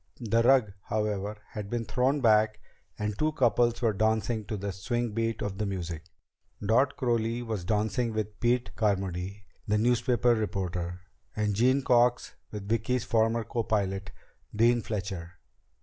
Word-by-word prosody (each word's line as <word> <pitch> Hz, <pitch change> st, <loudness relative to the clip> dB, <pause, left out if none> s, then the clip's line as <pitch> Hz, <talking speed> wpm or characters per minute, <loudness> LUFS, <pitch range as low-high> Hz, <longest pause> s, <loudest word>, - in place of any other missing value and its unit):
The 115 Hz, -1 st, +2 dB
rug, 120 Hz, -4 st, +4 dB
however, 105 Hz, -1 st, -2 dB
had 105 Hz, -2 st, -6 dB
been 120 Hz, 0 st, -2 dB
thrown 130 Hz, +5 st, +1 dB
back 110 Hz, -2 st, +4 dB, 0.4 s
and 105 Hz, -1 st, -2 dB
two 155 Hz, 0 st, +1 dB
couples 120 Hz, -3 st, +2 dB
were 115 Hz, -2 st, +3 dB
dancing 110 Hz, +1 st, 0 dB
to 110 Hz, -1 st, -4 dB
the 100 Hz, +1 st, -3 dB
swing 120 Hz, +5 st, -2 dB
beat 115 Hz, +1 st, -1 dB
of 100 Hz, -2 st, -4 dB
the 105 Hz, -, 0 dB
music. 85 Hz, -4 st, -4 dB, 0.5 s
Dot 125 Hz, +7 st, +2 dB
Crowley 120 Hz, -1 st, 0 dB
was 110 Hz, -6 st, -3 dB
dancing 110 Hz, +4 st, 0 dB
with 110 Hz, -1 st, -4 dB
Pete 120 Hz, +1 st, +1 dB
Carmody, 95 Hz, -1 st, -1 dB, 0.2 s
the 105 Hz, +1 st, +2 dB
newspaper 120 Hz, +1 st, +3 dB
reporter, 90 Hz, -5 st, -3 dB, 0.3 s
and 105 Hz, -1 st, 0 dB
Jean 130 Hz, +6 st, +3 dB
Cox 120 Hz, 0 st, +3 dB, 0.2 s
with 105 Hz, -2 st, -7 dB
Vicki's 115 Hz, +3 st, 0 dB
former 115 Hz, 0 st, +2 dB
copilot, 100 Hz, -5 st, -1 dB, 0.5 s
Dean 120 Hz, +2 st, +4 dB
Fletcher. 95 Hz, -6 st, -4 dB
110 Hz, 145 wpm, -28 LUFS, 100-120 Hz, 0.5 s, rug